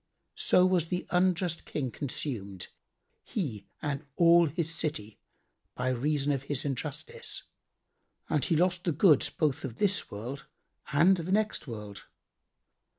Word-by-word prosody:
So 180 - +5
was 180 -3 +2
the 180 +1 -2
unjust 180 -2 +1
King 130 -5 -3
consumed, 110 - -4 0.5
he 125 - -4 0.2
and 145 0 -2
all 170 0 +6
his 165 +2 -1
city, 110 -11 -3 0.6
by 125 +1 -1
reason 145 +3 +1
of 135 -2 0
his 140 -1 -2
injustice, 145 +3 -4 0.8
and 150 - +1
he 165 - +1
lost 180 +2 +2
the 170 - +1
goods 155 -1 +5
both 150 -4 0
of 125 -4 -5
this 200 - +1
world 120 +7 -7 0.4
and 170 +6 +5
the 170 +2 -4
next 215 -6 +1
world. 105 -4 -8
150 Hz, 135 wpm, -30 LUFS, 130-175 Hz, 0.8 s, all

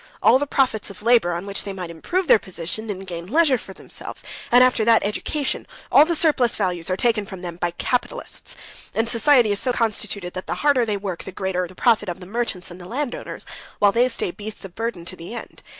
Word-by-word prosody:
All 260 - +6
the 290 - -1
profits 255 -7 +1
of 200 +1 -10
labor, 230 -6 +4
on 175 +3 -4
which 200 0 -1
they 200 - -5
might 180 -3 -6
improve 355 - -1
their 225 - +7
position, 190 +5 -5
and 195 -1 -4
gain 170 -2 -6
leisure 285 - +3
for 195 - -11
themselves, - - -9 0.3
and 245 +1 +8
after 250 -3 +3
that 225 0 +5
education, 275 +7 -2 0.2
all 295 - +8
the 340 +1 0
surplus 290 -8 +3
values 180 -4 -1
are 185 - 0
taken 225 -1 +2
from 190 -2 -9
them 170 -1 -5
by 175 0 0
the 170 - -13
capitalists. - - -3 0.4
And 225 +1 +1
society's 235 -4 +4
so 255 - +1
constituted 210 -5 -1
that 185 - -6
the - - -1
harder 260 -5 +4
they 210 -2 0
work, 190 -3 -5
the 190 - -7
greater 185 -1 -2
the 185 - -15
profit 215 -3 +3
of 175 - -5
the 180 - -10
merchants 200 -3 -3
and 175 +1 -10
landowners, 245 +8 -4 0.3
while 205 -1 +5
they 240 +4 +3
stay 230 -7 -1
beasts 210 +1 -7
of 185 - -10
burden 225 -6 -4
to 185 - -6
the 180 +7 -8
end. - - -9
210 Hz, 225 wpm, -22 LUFS, 185-245 Hz, 0.4 s, and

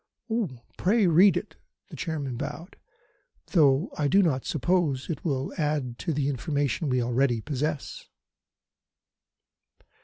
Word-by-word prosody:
"Pray 210 +3 +3
read 180 +4 +6
it" - - -6 0.3
the - - -9
Chairman 145 -7 -3
bowed 150 - -6 0.8
"though 145 -2 +4
I 145 - +2
do 195 +7 +4
not 135 -7 0
suppose 155 -2 0
it 155 - -5
will 135 -4 -2
add 145 -6 -1
to 170 - -2
the 145 -2 0
information 145 +2 -1
we 125 -1 +1
already 120 0 +1
possess." 150 +3 -4
145 Hz, 120 wpm, -27 LUFS, 135-165 Hz, 0.8 s, read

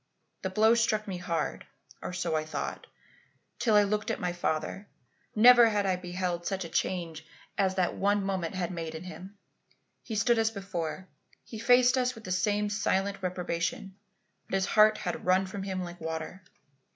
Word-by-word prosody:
The 190 - -2
blow 215 +4 +4
struck 220 -2 +1
me 190 -2 -4
hard, 170 -2 -3 0.3
or - - -5
so 170 -2 -2
I 155 - 0
thought, 155 -2 -5 0.7
till 220 -3 +3
I 210 - +7
looked 210 +1 -1
at - - -2
my 180 -3 -2
father. 175 +3 -2 0.5
Never 240 +1 +8
had 205 -2 0
I 190 -1 +2
beheld 180 -1 -3
such 190 -3 -2
a - - -7
change 165 -2 -2 0.3
as 190 -1 +1
that 185 -2 +1
one 205 0 +1
moment 190 -2 -2
had 180 -1 -2
made 165 -2 -5
in 160 - -7
him. 185 +2 -10 0.6
He 225 - -6
stood 225 +3 +3
as 220 0 +3
before; 190 -4 -5 0.4
he 220 - -9
faced 250 +2 +5
us 250 0 0
with 225 - -12
the 185 - -6
same 205 +3 +1
silent 200 -1 0
reprobation; 180 +1 -3 0.5
but - - -1
his 190 0 +1
heart 215 +1 +5
had 175 -3 -4
run 185 +1 +3
from 195 +1 -6
him 190 -1 -3
like 175 -1 -9
water. 160 +3 -5
190 Hz, 180 wpm, -29 LUFS, 175-210 Hz, 0.7 s, Never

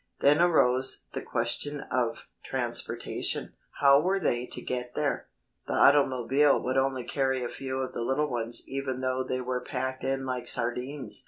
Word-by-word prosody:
Then 145 +3 +5
arose 130 -7 +3
the - - -3
question 130 +5 -2
of 125 -2 -1 0.2
transportation. - - -3 0.3
How 140 0 +7
were 190 +4 +1
they 125 -8 0
to - - -3
get 125 -1 -4
there? 145 -2 -1 0.4
The - - -2
automobile 140 0 +4
would 130 +1 -1
only 130 -1 0
carry 130 0 0
a 120 - -3
few 130 -1 -5
of 130 - -4
the - - -3
little 135 +5 +1
ones 120 -1 0
even 135 -1 -3
though 130 0 0
they 130 0 -2
were 125 0 -2
packed 130 +1 -3
in 135 0 -1
like 125 -2 -3
sardines. 125 +3 -2
130 Hz, 165 wpm, -28 LUFS, 125-140 Hz, 0.4 s, How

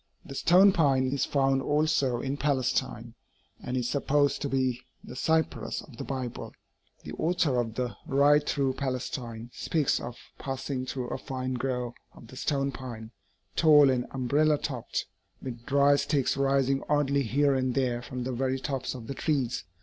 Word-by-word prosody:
The - - -8
stone 180 +8 +6
pine 140 -7 +3
is 140 -2 0
found 135 -1 +2
also 145 -4 +1
in 135 +1 -2
Palestine, 140 -3 -1 0.5
and 125 +1 -3
is 125 -2 0
supposed 145 +1 +1
to 140 - -2
be 130 -2 0 0.2
the 125 - -9
cypress 160 +4 0
of 130 -6 -15
the - - -5
Bible. 130 -3 -5 0.5
The - - -7
author 160 -5 +1
of 115 -2 -2
The 125 -2 -2
Ride 145 +2 +4
Through 135 -2 +1
Palestine 125 -3 -4
speaks 155 -4 0
of 120 0 -7 0.2
passing 135 -1 -4
through 125 -2 -4
a - - -4
fine 130 -2 -4
grove 125 -1 -2 0.2
of 115 - -14
the 130 - -11
stone 140 +1 0
pine, 115 -5 -8 0.4
'tall 150 -4 +6
and 125 -1 -1
umbrella 145 +4 +2
topped,' 130 -5 -3 0.3
with 120 -2 -8
dry 140 0 +5
sticks 140 -2 +1
rising 135 0 +2
oddly 140 -1 +2
here 140 +3 +2
and 130 -1 0
there 125 -3 0
from 125 0 -5
the 130 - -3
very 130 +2 0
tops 135 -1 -3
of 120 -3 -8
the 140 - -5
trees. 135 - -1
135 Hz, 165 wpm, -28 LUFS, 125-145 Hz, 0.5 s, stone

